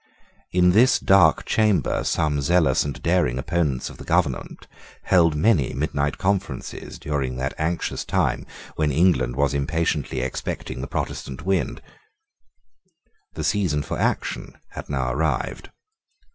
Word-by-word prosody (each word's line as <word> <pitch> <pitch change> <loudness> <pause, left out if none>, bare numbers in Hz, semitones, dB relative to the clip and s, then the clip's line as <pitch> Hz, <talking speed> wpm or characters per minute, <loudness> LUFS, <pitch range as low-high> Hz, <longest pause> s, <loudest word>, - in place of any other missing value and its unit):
In 90 0 +4
this 120 +7 +5
dark 95 -5 +4
chamber 105 -3 +1
some 75 -2 0
zealous 80 -2 +3
and 70 -4 -5
daring 85 -8 +2
opponents 70 -1 -1
of - - -10
the - - -8
government 80 -7 -1 0.4
had - - -13
held 85 -3 +5
many 75 - +2
midnight 70 0 -1
conferences 95 0 -3
during 70 -4 -2
that 65 +2 -2
anxious 85 +2 -2
time - - 0 0.3
when 75 -1 +1
England 65 -6 +2
was 70 0 +1
impatiently 70 -2 -1
expecting 65 0 -4
the 70 - -5
Protestant 70 +4 -5
wind. 95 -2 -1 1.5
The 80 - -5
season 75 -5 +1
for - - -4
action - - -2
had - - -9
now 65 -3 -1
arrived. 75 -2 -2
75 Hz, 130 wpm, -23 LUFS, 70-90 Hz, 1.5 s, this